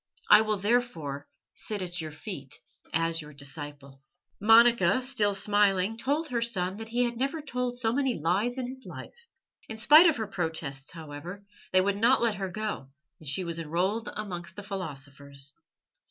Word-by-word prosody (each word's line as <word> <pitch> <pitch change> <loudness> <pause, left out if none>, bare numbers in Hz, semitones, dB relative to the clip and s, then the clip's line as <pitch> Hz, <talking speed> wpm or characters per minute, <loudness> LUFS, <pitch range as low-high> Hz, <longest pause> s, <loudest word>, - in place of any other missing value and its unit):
I 210 - +10
will 215 -1 0
therefore 190 - -1 0.3
sit 210 -3 -4
at 175 -1 -4
your 160 - -5
feet 150 - -7 0.3
as 165 +1 0
your 150 0 -11
disciple." 140 -1 -7 0.4
Monica, 225 -1 +6
still 220 -6 +2
smiling, 200 0 +2
told 290 +7 -1
her 240 -2 -1
son 190 -5 -1
that 225 0 -7
he 240 +2 +1
had 240 -1 -2
never 275 +6 -1
told 250 -4 -3
so 225 -2 +1
many 265 -2 +1
lies 195 - +1
in 255 - -2
his 260 +1 -8
life. 475 0 -11 0.4
In 220 - -5
spite 305 +9 +8
of 320 - +3
her 220 - -2
protests, 160 -8 -4
however, 165 +5 -8 0.3
they 185 - +5
would 200 +1 0
not 235 +5 +4
let 230 -2 +2
her 195 -1 -3
go, 210 -9 -4 0.3
and 155 - -7
she 185 +6 -1
was 170 -1 -4
enrolled 180 +8 -1
amongst 180 -4 -6
the 205 - -7
philosophers. 140 -7 -6
200 Hz, 170 wpm, -28 LUFS, 160-235 Hz, 0.4 s, I